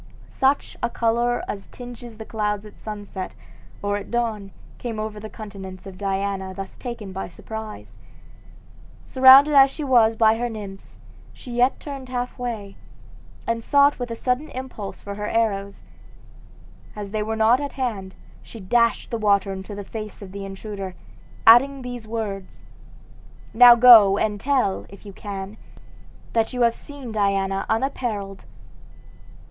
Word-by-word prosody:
Such 270 +2 +1
a 240 - 0
color 235 +1 0
as 195 - -6
tinges 245 -2 -10
the 220 - -8
clouds 210 -2 -2
at 210 - -14
sunset 205 -3 -7 0.5
or 205 0 0
at 205 - -8
dawn 225 -4 -2 0.3
came 230 -3 -4
over 215 -1 -4
the 215 +1 -8
countenance 195 -4 -9
of 195 -1 -9
Diana 195 -1 -2
thus 195 0 -7
taken 235 -6 -7
by 190 -1 -5
surprise. 220 +4 -8 1.1
Surrounded 265 +3 +7
as 275 -1 +7
she 300 - -6
was 235 -5 +4
by 220 0 +4
her 240 0 -1
nymphs, 200 -3 -9 0.4
she 250 - -11
yet 245 +2 +2
turned 275 -3 -8
half 250 0 -4
away, 215 -5 -5 0.7
and 230 0 -2
sought 285 +1 +4
with 245 -1 -4
a 230 - -4
sudden 250 +6 -1
impulse 255 -6 -7
for 200 - -6
her 210 +1 -4
arrows. 200 -3 -1 1.1
As 205 -2 -6
they 215 0 -1
were 220 +1 -2
not 220 +3 +4
at 285 - -4
hand, 210 -8 -4 0.3
she 230 - -12
dashed 235 +4 +1
the 230 - -2
water 200 -2 +2
into 190 +2 -7
the 205 - -6
face 215 0 -8
of 190 - -10
the 200 0 -6
intruder, 195 -1 -7 0.5
adding 265 +4 +6
these 245 -3 -7
words: 205 -4 -5 0.9
"Now 245 +1 +9
go 225 -5 +8
and 210 -1 -1
tell, 260 -8 0
if 200 +2 -14
you 200 - -9
can, 200 0 -7 0.8
that 225 +2 +1
you 250 -1 +1
have 235 -1 +4
seen 280 -4 -10
Diana 195 -2 0
unapparelled." 220 -5 -2
220 Hz, 155 wpm, -23 LUFS, 200-245 Hz, 1.1 s, Now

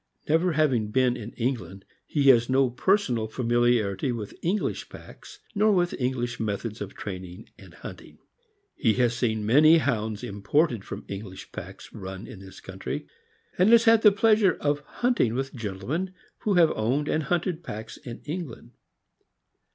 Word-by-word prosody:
Never 165 +3 +2
having 135 -9 +1
been 125 +2 +2
in 110 0 -7
England, 115 -6 -3 0.2
he 145 - 0
has 120 -2 +5
no 130 -1 +3
personal 125 - +1
familiarity 120 -2 +1
with 110 -4 -5
English 195 +5 -1
packs, - - -13 0.2
nor 215 0 +3
with 175 -3 +2
English 120 -1 -2
methods 105 0 -3
of 100 -1 -6
training 95 -2 -8
and - - -15
hunting. - - -11 0.6
He 110 -3 +2
has 120 -2 +2
seen 110 -3 -1
many 155 +8 +6
Hounds 110 -7 -1
imported 115 +4 0
from - - -8
English 100 -1 -8
packs - - -9
run 95 +1 -7
in 100 - -10
this 95 -1 -12
country, - - -6 0.5
and 185 +4 +5
has 230 0 +7
had 225 -1 +5
the 210 - +7
pleasure 210 -1 +3
of 145 0 0
hunting 150 - 0
with 135 +1 -3
gentlemen 120 - -4 0.2
who 205 -3 0
have 170 -3 +5
owned 130 +7 0
and 155 - +1
hunted 175 +1 -1
packs 110 -3 -7
in 120 -2 -10
England. 155 -5 -6
125 Hz, 155 wpm, -26 LUFS, 110-165 Hz, 0.6 s, has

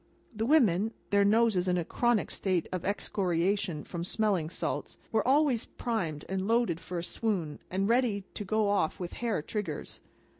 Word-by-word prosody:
The 220 +2 -1
women 225 - +4 0.2
(their 200 0 +5
noses 210 -3 +3
in 180 0 +2
a 170 - -1
chronic 240 +1 +1
state 185 -4 0
of 185 -2 -3
excoriation 190 -3 0
from 170 -2 -5
smelling 190 -4 0
salts) - - -3
were 220 +1 +1
always 270 -4 +3
primed 170 -11 -3
and 190 0 -2
loaded 230 -8 +2
for 180 +1 -6
a 170 - -2
swoon, 180 -7 -2
and 195 +2 0
ready 230 -4 +2
to - - -4
go 215 +1 +1
off 200 -6 +1
with 175 -2 -5
hair 230 -10 -1
triggers. 210 +3 -5
200 Hz, 165 wpm, -30 LUFS, 180-225 Hz, 0.2 s, their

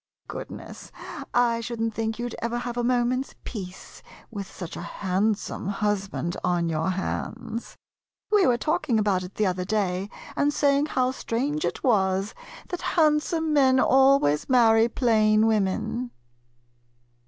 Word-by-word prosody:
Goodness, - - -8 0.4
I 235 -1 +2
should 235 0 -5
n't 225 0 -1
think 225 0 -2
you 240 0 -3
'd 240 - -7
ever 235 +1 -1
have 240 0 -4
a 240 - -1
moment's 250 +2 0
peace 185 -5 -8 0.3
with 200 -3 -5
such 175 -1 -8
a - - -6
handsome 195 +1 -2
husband 195 -3 -1
on 175 -1 +1
your 160 +2 0
hands. 195 +4 -4 0.5
We 410 -4 +5
were 245 -2 +3
talking 305 -5 0
about 205 -3 +2
it 180 +1 -9
the 215 - +1
other 185 -1 0
day, 195 -1 -1 0.3
and 290 0 +2
say 280 -1 +3
ing 295 - 0
how 255 -3 +1
strange 270 +5 -2
it - - -3
was 195 -4 +2 0.4
that 360 -1 -4 0.2
handsome 310 0 +2
men 265 -3 +5
always 265 - +4
marry 230 -2 +5
plain 220 -3 +3
women. 220 +3 0
225 Hz, 145 wpm, -25 LUFS, 195-255 Hz, 0.5 s, We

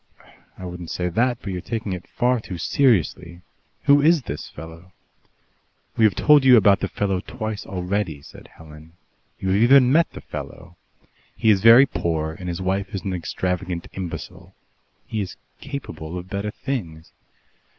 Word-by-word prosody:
"I 95 - -8
wouldn't 90 -1 -7
say 90 0 -2
that, 120 +7 +1
but 100 - -4
you're 90 - -4
taking 110 -2 -4
it 90 -1 -7
far 125 0 +1
too 95 -4 -7
seriously. 85 - +1 0.4
Who 145 0 +5
is 160 -1 +4
this 75 - -6
fellow?" 80 +3 -12 1.0
"We 110 - +4
have 105 - +3
told 150 -2 +5
you 130 -2 +7
about 100 -2 +5
the - - -2
fellow 95 -2 -1
twice 110 0 -6
already," 90 -5 -3
said 75 - -14
Helen. 80 0 -15 0.4
"You 95 - -3
have 100 +3 +2
even 130 +1 +6
met 165 +4 +3
the - - -9
fellow. 85 +1 -9 0.6
He 110 - +4
is 100 -2 +2
very 115 +5 +8
poor 80 - -2
and 90 +3 -7
his 85 +1 -4
wife 95 +3 -2
is 95 - -4
an 95 - -3
extravagant 90 0 -3
imbecile. 85 -4 -8 0.5
He 110 - -3
is 95 - -6 0.2
capable 90 - -7
of 90 +2 -9
better 100 +1 -2
things. 90 - -5
95 Hz, 165 wpm, -22 LUFS, 85-115 Hz, 1.0 s, very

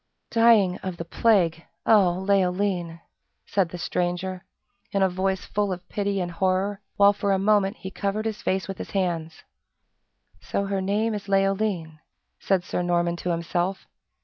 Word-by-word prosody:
"Dying 225 -6 +5
of 185 -2 -5
the 170 - -5
plague, 170 -4 +2 0.2
O 195 -5 +5
Leoline!" 180 -3 +1 0.4
said 190 -4 +1
the 180 - -7
stranger, 180 +1 -2 0.5
in 195 -1 +2
a 190 - +4
voice 190 +1 -1
full 205 -1 -1
of 180 -1 -6
pity 200 -1 -1
and 175 -1 -2
horror, 190 +3 0 0.2
while 200 0 +6
for 200 0 -1
a 195 - +3
moment 200 +1 +2
he 190 - -7
covered 200 +3 -2
his 220 +1 -3
face 190 -3 -1
with 195 - -6
his - - -6
hands. 170 -4 -2 1.0
"So 200 - -2
her 195 -1 -1
name 210 +4 0
is 205 -1 -5
Leoline?" 195 -5 0 0.4
said 190 -2 +1
Sir 180 - -2
Norman 175 -1 +1
to 180 - -4
himself. 175 +2 -1
190 Hz, 160 wpm, -25 LUFS, 175-200 Hz, 1.0 s, while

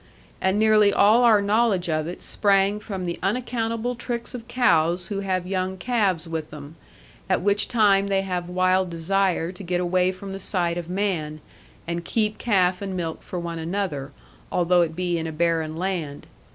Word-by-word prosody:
And 190 +2 +2
nearly 215 -1 +5
all 210 +4 +5
our 215 -4 +5
knowledge 205 -3 +2
of 155 -1 -1
it 175 - -7
sprang 200 0 +2
from 195 -4 -5
the 170 -1 -4
unaccountable 230 +2 -1
tricks 240 0 -5
of 235 -2 -8
cows 180 -8 +2
who 200 -2 -2
have 185 -2 -1
young 185 0 -2
calves 195 -6 0
with 160 -1 -4
them; 150 +1 -10 0.5
at - - +1
which 205 +1 +2
time 200 -4 +3
they 195 -1 +1
have 180 -2 -3
wild 185 +1 +2
desire 175 0 0
to 190 +1 -10
get 175 0 -1
away 180 +1 +2
from 195 +1 -8
the 195 - -6
sight 175 -3 -1
of 170 -1 -8
man, 180 -6 -2 0.5
and 170 0 -3
keep 215 +3 -1
calf 185 -5 +2
and 195 -2 -4
milk 165 -2 -4
for 180 - -6
one 170 -1 -5
another, 160 -5 -3 0.4
although 180 0 +3
it 160 -2 -1
be 175 -1 -1
in 165 - -3
a - - -4
barren 160 -1 0
land. 170 -6 -3
185 Hz, 180 wpm, -24 LUFS, 170-205 Hz, 0.5 s, nearly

